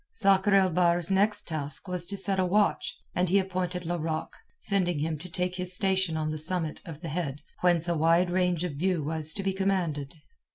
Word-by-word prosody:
Sakr 195 -1 +4
el 190 -2 +4
Bahr's 175 +1 +1
next 205 +2 +3
task 150 0 -2
was 180 -1 -2
to 200 +1 -3
set 195 0 +2
a 185 - +2
watch, 205 +3 0 0.2
and 180 0 0
he 195 - +3
appointed 180 -2 -2
Larocque, 160 -2 -3 0.2
sending 185 - 0
him 155 +2 -2
to 180 +4 -8
take 180 +1 -2
his 180 0 +4
station 190 -5 +1
on 155 0 -2
the 155 - -3
summit 165 0 -2
of 160 -2 -9
the 170 - -6
head 150 -3 -4 0.2
whence 175 -2 +2
a 170 - 0
wide 165 +3 +2
range 180 -2 0
of 180 -4 -3
view 175 +2 -1
was 155 +1 +2
to 195 - -3
be 195 0 -1
commanded. 175 -7 -2
180 Hz, 205 wpm, -27 LUFS, 160-190 Hz, 0.2 s, Sakr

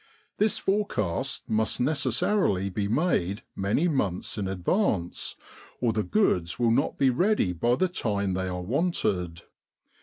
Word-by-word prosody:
This 215 +1 +3
forecast 190 - -1
must 110 0 0
necessarily 125 - +1
be 100 +1 -1
made 110 - 0
many 100 - +1
months 100 - -1
in 100 -3 -2
advance, 95 - -1 0.4
or 120 -2 +1
the 110 - 0
goods 95 - +1
will 120 -1 +2
not 130 +5 +1
be 135 -2 +4
ready 175 - +2
by 120 +8 +1
the 185 - +1
time 100 - -1
they 95 0 -2
are 90 -1 -4
wanted. 95 - -1
110 Hz, 140 wpm, -27 LUFS, 95-155 Hz, 0.4 s, be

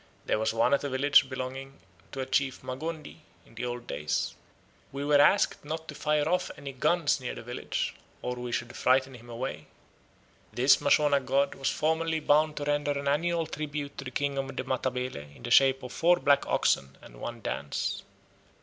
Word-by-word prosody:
There - - +1
was 110 - +1
one 115 +4 +2
at 140 - +2
a 145 - -2
village 135 +1 +4
belonging 135 +1 -6 0.3
to 135 - -4
a - - -2
chief 130 0 0
Magondi, 155 +4 -5 0.3
in - - -20
the 115 - -4
old 120 0 -5
days. 75 +1 -2 0.6
We 140 +1 -4
were 145 -1 +5
asked 200 +7 +3
not 160 +2 -5
to - - -5
fire 150 0 0
off 180 +2 +1
any 140 -1 -7
guns 150 +3 +2
near 125 - -4
the - - -8
village, 120 +1 -3 0.3
or 125 - -2
we 125 0 -5
should 120 0 -3
frighten 130 +1 +2
him 120 -1 -13
away." 115 - -5 0.8
This 130 +3 +4
Mashona 145 0 +4
god 135 +2 +1
was 135 - -1
formerly 160 +1 0
bound 150 +1 +3
to 145 - -2
render 145 0 0
an 140 0 -4
annual 165 +3 +1
tribute 150 -2 -5
to - - -5
the - - -4
king 140 +2 -1
of 135 0 -4
the - - -2
Matabele 125 - -3
in - - -16
the 120 - -5
shape 135 +1 +5
of 125 - -7
four 175 +1 +4
black 140 -1 +3
oxen 70 0 +1
and - - -14
one 120 0 -5
dance. 70 -7 -3
135 Hz, 195 wpm, -29 LUFS, 125-145 Hz, 0.8 s, were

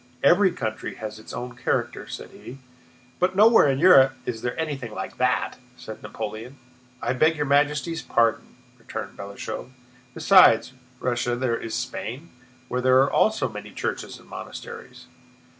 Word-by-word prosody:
"Every 185 +7 +5
country 110 -10 -4
has 110 0 -7
its 110 - -11
own 125 0 -6
character," 125 - -2
said - - -8
he. 130 - -11 0.6
"But 185 +1 +1
nowhere 220 -4 +6
in 135 - +1
Europe 135 -5 +7
is 115 -2 -4
there 120 +5 -3
anything 140 -8 -4
like 95 - -6
that," 125 0 0 0.2
said 110 - -9
Napoleon. 110 +4 -7 0.5
"I - - 0
beg 155 +5 +3
your 150 - 0
Majesty's 145 +3 +1
pardon," 115 -1 0 0.2
returned - - -7
Balashëv, 100 +5 -7 0.5
"besides 160 - +6 0.3
Russia 120 -1 -1
there 120 -1 0
is 115 -1 -5
Spain, 135 +9 -5 0.4
where 125 0 -2
there 130 0 +4
are 140 - -1
also 220 0 +2
many - - -8
churches - - -4
and - - -19
monasteries." 470 -1 -9
130 Hz, 150 wpm, -24 LUFS, 115-160 Hz, 0.6 s, Europe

